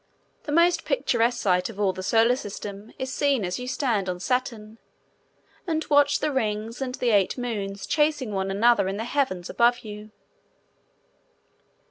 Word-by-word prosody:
The 295 - -4
most 340 +3 +3
picturesque 235 - +1
sight 180 -1 +1
of 210 -3 -10
all 195 -2 +2
the 185 - -6
Solar 225 +5 +3
System 205 -2 -8
is 260 0 -4
seen 275 -8 +1
as 180 +6 -3
you 250 - -6
stand 235 -8 -1
on 180 0 -3
Saturn, 225 +1 -3 0.9
and 320 -2 -1
watch 285 0 +5
the 305 - 0
rings 225 -1 -2
and 255 -1 -3
the 245 -3 0
eight 200 +1 +2
moons 200 -5 -4
chasing 295 -6 +1
one 195 -1 -2
another 210 +1 +3
in 195 +1 -3
the 220 - -3
heavens 235 -9 -1
above 240 0 +2
you. 210 0 -9
230 Hz, 160 wpm, -25 LUFS, 200-260 Hz, 0.9 s, watch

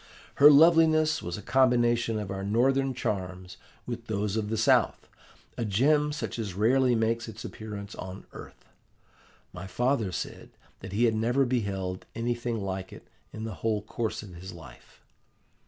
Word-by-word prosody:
Her 145 +1 +9
loveliness 155 0 +5
was 85 0 -5
a 105 - -9
combination 120 -3 +2
of 105 -2 -4
our 95 0 -4
Northern 130 +5 +1
charms 95 -5 -4 0.3
with 120 -1 -6
those 105 -1 -1
of 105 -2 -2
the 110 - -1
South, 110 - +2 0.5
a - - 0
gem 145 +8 +2
such 145 -5 -4
as 100 -5 -4
rarely 125 +4 +3
makes 115 +1 0
its 110 0 -9
appearance 105 -1 -7
on 95 +1 -8
earth. - - -12 0.9
My 90 +1 -7
father 115 +1 0
said - - -6 0.3
that 95 - -9
he 105 +5 +1
had 115 - +3
never 120 +5 +2
beheld 100 -7 -2
anything 120 0 -2
like 95 -1 -4
it - - -13 0.2
in 110 - -7
the 110 -1 -4
whole 110 -2 0
course 110 0 -3
of 100 -3 -11
his 90 +2 -9
life. 65 -8 -15
110 Hz, 160 wpm, -28 LUFS, 100-125 Hz, 0.9 s, Her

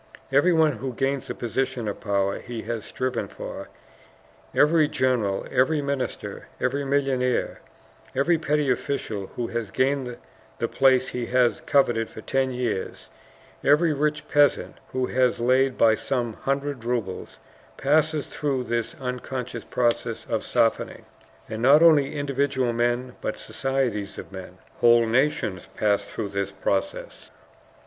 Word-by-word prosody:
Everyone 160 +2 +4
who 130 +2 -5
gains 135 +1 -1
a - - -3
position 130 0 -2
of 105 - -4
power 100 -1 0
he 120 -2 -7
has 115 -3 -4
striven 130 0 -2
for, - - -8 0.8
every 155 0 +4
general, 125 -9 0
every 135 +5 +3
minister, 140 -2 -4
every 140 +3 0
millionaire, 135 -3 0 0.5
every 160 +5 +2
petty 150 -3 +1
official 115 -6 -2
who 120 - -2
has 115 -3 -3
gained 130 +2 0 0.4
the - - -1
place 130 -1 +3
he 120 -1 -4
has 125 -1 +2
coveted 120 -5 +2
for 110 - -10
ten 135 +3 0
years, 125 -6 -3 0.5
every 155 +2 +4
rich 150 +1 -1
peasant 145 -1 +2
who 130 -1 0
has 125 -1 +1
laid 130 +2 +2
by 110 -1 +5
some 120 0 -2
hundred 140 0 -2
rubles, 115 -6 -3 0.4
passes 155 +1 +2
through 140 -4 -2
this 120 -1 -2
unconscious 125 0 -4
process 120 -1 -1
of - - -1
softening. - - 0 0.4
And 110 0 -5
not 140 +6 +6
only 150 -4 +5
individual 140 -3 0
men, 120 +2 -1
but - - -3
societies 125 -7 -2
of - - -8
men, 95 -1 -9 0.2
whole 120 0 +5
nations, 115 -6 0
pass 105 -1 +2
through 105 -3 -5
this 100 0 -2
process. 95 0 -3
130 Hz, 135 wpm, -25 LUFS, 115-140 Hz, 0.8 s, not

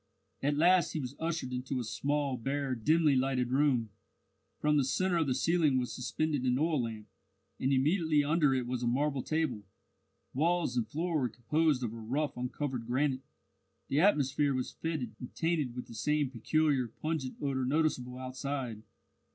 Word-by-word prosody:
At 145 +1 +1
last 175 +3 +4
he 160 - -1
was 130 -1 -5
ushered 160 -6 -2
into 125 +1 -2
a - - -2
small, 140 +5 -1
bare, 135 +2 -2
dimly 150 +5 +3
lighted 130 -1 +1
room. 130 -5 +2 0.7
From 150 0 +2
the 140 - +4
centre 175 +7 +1
of 160 -3 +1
the 130 - +1
ceiling 165 -5 +2
was 125 -1 -1
suspended 145 +3 -1
an 125 -1 +2
oil 155 -1 +1
lamp, 110 -2 -5 0.5
and 135 - +1
immediately 150 +2 +3
under 150 -1 +3
it 125 -2 -1
was 125 0 -3
a 120 - 0
marble 140 +2 +1
table. 155 -7 -1 0.7
Walls 165 -1 +1
and 120 -3 0
floor 160 +5 -1
were 125 -3 0
composed 140 +4 +1
of 115 -2 -2
rough 125 +7 -2
uncovered 125 -1 -3
granite. 130 +1 +1 0.7
The 140 - +2
atmosphere 145 -6 +3
was 130 - -2
fetid, 150 -9 -3
and 125 - -9
tainted 160 -7 0
with 125 - -5
the - - -12
same 150 +3 0
peculiar, 135 +1 +1
pungent 150 +2 -3
odour 135 -2 -1
noticeable 130 -3 0
outside. 130 -3 -4
135 Hz, 165 wpm, -31 LUFS, 125-155 Hz, 0.7 s, last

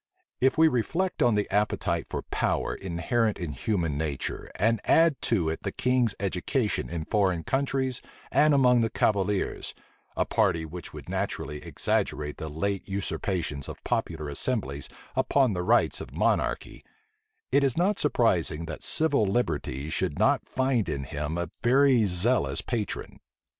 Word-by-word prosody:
If 130 +4 +3
we 160 0 +7
reflect 165 +8 -1
on 120 -3 +4
the 105 -1 0
appetite 100 -5 0
for - - -4
power - - -1
inherent 100 +5 -1
in 85 -4 -4
human 80 -2 -1
nature, 75 -4 -3
and 110 +2 +1
add 165 -3 +4
to 95 -9 +2
it 80 0 -2
the - - -3
king's 125 -4 +1
education 100 +5 -1
in 85 -2 -4
foreign 95 -5 +1
countries 135 - -1 0.3
and 150 +1 +5
among 125 -3 +5
the 115 - +1
cavaliers, 100 -2 0 0.4
a - - +2
party 85 -3 +1
which 85 +2 -8
would - - -10
naturally 80 -6 -3
exaggerate 75 -1 -1
the 80 - -5
late 100 +6 -3
usurpations 90 -6 -2
of - - -9
popular 80 -2 -2
assemblies 70 - -2 0.3
upon 130 -2 +2
the 90 - -2
rights 90 - +2
of - - -8
monarchy, - - 0 0.7
it 140 - +4
is 135 -1 +1
not 190 +4 +2
surprising 90 - +1
that 80 -1 -7
civil 145 -9 +2
liberty 75 - -1
should - - -1
not - - +2
find 130 -5 +1
in 70 - -2
him 75 +4 -4
a 85 -2 -3
very 130 -1 +4
zealous 100 +7 +1
patron. 115 -4 -3
100 Hz, 150 wpm, -27 LUFS, 80-125 Hz, 0.7 s, we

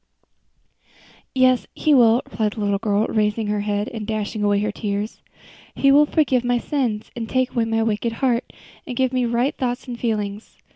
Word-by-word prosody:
"Yes, 255 -1 +3
He 305 - +2
will," 235 -2 +5
replied 210 0 -2
the 220 - -6
little 200 -1 0
girl, 210 0 +1
raising 215 0 0
her 210 0 -1
head 205 +1 -1
and 220 -3 -6
dashing 215 -1 -3
away 205 -1 +3
her 210 0 -1
tears, 205 +1 -4 0.5
"He 275 - +4
will 295 +2 +6
forgive 270 -6 +2
my 245 0 +1
sins, 240 -5 -2
and 225 -2 -5
take 255 -1 +1
away 230 -2 0
my 225 0 0
wicked 225 +1 -1
heart, 245 0 0 0.4
and 250 -3 -5
give 260 -1 +1
me 255 -1 +1
right 240 +4 0
thoughts 250 -1 -3
and 240 -1 -6
feelings. 210 -2 -3
225 Hz, 185 wpm, -22 LUFS, 210-250 Hz, 0.5 s, will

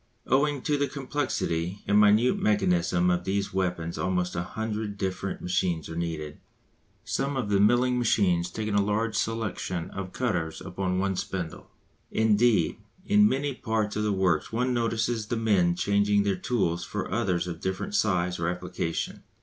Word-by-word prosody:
Owing 140 +1 +2
to 145 -1 +1
the 145 - +2
complexity 125 - -2
and 105 +1 +4
minute 105 +4 +4
mechanism 90 -4 +2
of 90 0 0
these 100 +1 -1
weapons 90 -3 -2
almost 90 -1 -1
a 85 - 0
hundred 105 +2 -4
different 95 0 -3
machines 90 -3 0
are 80 - -6
needed, 80 -3 -4 0.7
some 135 0 -1
of 115 -6 -2
the 100 -1 +3
milling 120 +4 +4
machines 90 -7 +2
taking 110 -1 -3
a 100 - +4
large 110 +2 0
selection 100 -6 -2
of 95 -2 -6
cutters 90 -11 -2
upon 90 0 -2
one 95 0 0
spindle. 90 -3 -5 0.4
Indeed, 110 +1 +3 0.3
in 210 +1 +5
many 140 +1 -1
parts 110 -4 -1
of 105 - 0
the 105 0 +1
works 95 -5 +1
one 125 +3 0
notices 115 -1 0
the 120 - -1
men 95 -6 +2
changing 100 +2 +2
their 100 -1 +1
tools 90 -4 -1
for - - -4
others 90 -1 0
of 85 -1 -6
different 95 - -3
size 90 - +1
or 85 0 0
application. 85 -2 -3
100 Hz, 160 wpm, -27 LUFS, 90-115 Hz, 0.7 s, in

